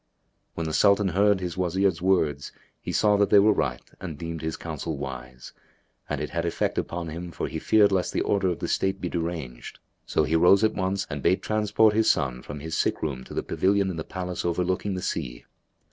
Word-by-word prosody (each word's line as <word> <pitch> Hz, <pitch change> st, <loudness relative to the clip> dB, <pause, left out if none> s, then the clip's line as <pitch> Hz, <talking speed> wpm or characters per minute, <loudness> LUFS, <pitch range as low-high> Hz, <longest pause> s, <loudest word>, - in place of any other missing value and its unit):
'''[FN#279] -, -, -47 dB
When 85 Hz, -, -3 dB
the 80 Hz, -, -3 dB
Sultan 100 Hz, +4 st, +4 dB
heard 100 Hz, +2 st, +3 dB
his 90 Hz, -1 st, -5 dB
Wazir's 95 Hz, -1 st, +1 dB
words 80 Hz, -7 st, +1 dB, 0.3 s
he -, -, -4 dB
saw 105 Hz, -1 st, +3 dB
that 100 Hz, 0 st, +3 dB
they 105 Hz, -, +6 dB
were 105 Hz, +2 st, +6 dB
right 60 Hz, -9 st, -2 dB, 0.2 s
and 85 Hz, -6 st, -6 dB
deemed 80 Hz, 0 st, -5 dB
his 80 Hz, 0 st, -3 dB
counsel 80 Hz, -1 st, -5 dB
wise, 65 Hz, -2 st, -8 dB, 0.6 s
and -, -, -2 dB
it -, -, -4 dB
had 85 Hz, 0 st, -1 dB
effect 85 Hz, -, -1 dB
upon 85 Hz, -1 st, -4 dB
him 85 Hz, +3 st, -6 dB
for -, -, -3 dB
he -, -, -4 dB
feared 105 Hz, -2 st, +4 dB
lest 95 Hz, -2 st, +1 dB
the -, -, -1 dB
order 100 Hz, -2 st, +1 dB
of 90 Hz, -2 st, 0 dB
the -, -, -4 dB
state 95 Hz, 0 st, 0 dB
be 90 Hz, -, -3 dB
deranged; 80 Hz, -8 st, -5 dB, 0.3 s
so -, -, +2 dB
he 80 Hz, -, 0 dB
rose 90 Hz, +5 st, +5 dB
at 110 Hz, 0 st, +3 dB
once 95 Hz, 0 st, -1 dB
and 70 Hz, 0 st, -5 dB
bade 95 Hz, -, +2 dB
transport 110 Hz, 0 st, +3 dB
his 110 Hz, +1 st, +3 dB
son 60 Hz, -2 st, 0 dB
from 75 Hz, -1 st, -8 dB
his 80 Hz, +1 st, -4 dB
sick -, -, 0 dB
room 65 Hz, -4 st, -3 dB
to -, -, -10 dB
the -, -, -1 dB
pavilion 100 Hz, 0 st, +1 dB
in -, -, -6 dB
the 80 Hz, -, -3 dB
palace 90 Hz, 0 st, -5 dB
overlooking 90 Hz, +3 st, -1 dB
the 90 Hz, -, -4 dB
sea. -, -, -4 dB
90 Hz, 220 wpm, -26 LUFS, 80-100 Hz, 0.6 s, they